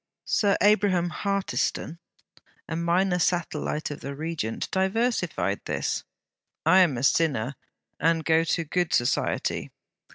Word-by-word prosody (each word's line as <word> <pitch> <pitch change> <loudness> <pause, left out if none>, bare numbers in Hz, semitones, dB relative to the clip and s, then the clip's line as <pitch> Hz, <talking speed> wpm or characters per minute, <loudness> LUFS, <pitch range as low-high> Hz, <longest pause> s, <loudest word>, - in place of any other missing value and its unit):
Sir 200 -3 +2
Abraham 200 -4 +3
Hartiston, 195 -4 -2 0.7
a 165 - -3
minor 180 +2 +1
satellite 160 -3 -1
of 145 - -6
the 140 0 -6
Regent, 150 -7 -3
diversified 190 - 0
this: - - -2 0.6
'I 175 +4 +6
am 165 -9 +4
a 120 - -4
sinner, 140 -5 +2 0.5
and 165 +1 +1
go 160 0 +4
to 165 +1 0
good 175 +2 -1
society.' 120 - 0
165 Hz, 120 wpm, -26 LUFS, 150-190 Hz, 0.7 s, I